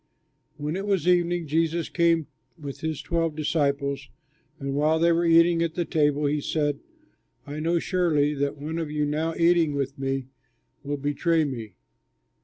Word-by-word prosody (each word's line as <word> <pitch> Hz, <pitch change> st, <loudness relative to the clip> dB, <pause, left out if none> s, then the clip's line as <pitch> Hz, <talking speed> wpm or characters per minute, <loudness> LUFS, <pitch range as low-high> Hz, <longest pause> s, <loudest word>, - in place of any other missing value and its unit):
When 150 Hz, +2 st, -3 dB
it 195 Hz, +2 st, -4 dB
was 190 Hz, -5 st, +1 dB
evening 175 Hz, -1 st, +2 dB
Jesus 165 Hz, +2 st, 0 dB
came 170 Hz, -2 st, +2 dB, 0.3 s
with 140 Hz, -3 st, -7 dB
his 160 Hz, -2 st, -3 dB
twelve 165 Hz, -3 st, -1 dB
disciples; 140 Hz, -2 st, -1 dB, 0.5 s
and 140 Hz, -1 st, -3 dB
while 155 Hz, +3 st, +2 dB
they 170 Hz, +1 st, +3 dB
were 170 Hz, +1 st, +2 dB
eating 165 Hz, 0 st, +5 dB
at 165 Hz, -1 st, -1 dB
the 175 Hz, -, -1 dB
table, 150 Hz, -2 st, +1 dB
he 145 Hz, +1 st, 0 dB
said, 145 Hz, -1 st, -1 dB, 0.7 s
"I 145 Hz, +1 st, -6 dB
know 165 Hz, +2 st, +1 dB
surely 160 Hz, -5 st, +1 dB
that 140 Hz, 0 st, -2 dB
one 155 Hz, +3 st, -4 dB
of 160 Hz, -2 st, -3 dB
you 150 Hz, 0 st, 0 dB
now 155 Hz, +3 st, -1 dB
eating 170 Hz, -3 st, +3 dB
with 140 Hz, -1 st, -3 dB
me 135 Hz, -1 st, -2 dB, 0.5 s
will 145 Hz, 0 st, -3 dB
betray 150 Hz, +4 st, +1 dB
me." 115 Hz, -9 st, -5 dB
155 Hz, 165 wpm, -25 LUFS, 145-170 Hz, 0.7 s, eating